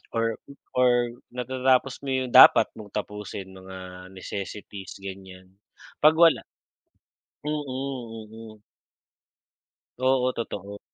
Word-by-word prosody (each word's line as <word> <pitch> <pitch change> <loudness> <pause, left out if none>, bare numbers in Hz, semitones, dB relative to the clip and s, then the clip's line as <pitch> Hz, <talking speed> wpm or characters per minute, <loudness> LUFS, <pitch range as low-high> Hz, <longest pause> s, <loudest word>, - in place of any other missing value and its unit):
or 115 -1 0 0.4
or 120 -1 +4 0.2
natatapos 130 +1 +1
mo 135 - -3
yung 130 -1 -1
dapat - - +9
mong 105 -2 -10
tapusin, 105 -2 -5
mga 95 -1 -10
necessities, 100 +1 -7
ganyan. 95 -1 -10 0.5
Pag 155 +1 +7
wala 165 -1 +6 1.1
Mm, 150 0 -1 0.7
mm. 110 0 -12 1.4
Oo, 130 -1 +3
totoo. 100 -3 -5
110 Hz, 95 wpm, -26 LUFS, 95-130 Hz, 1.4 s, dapat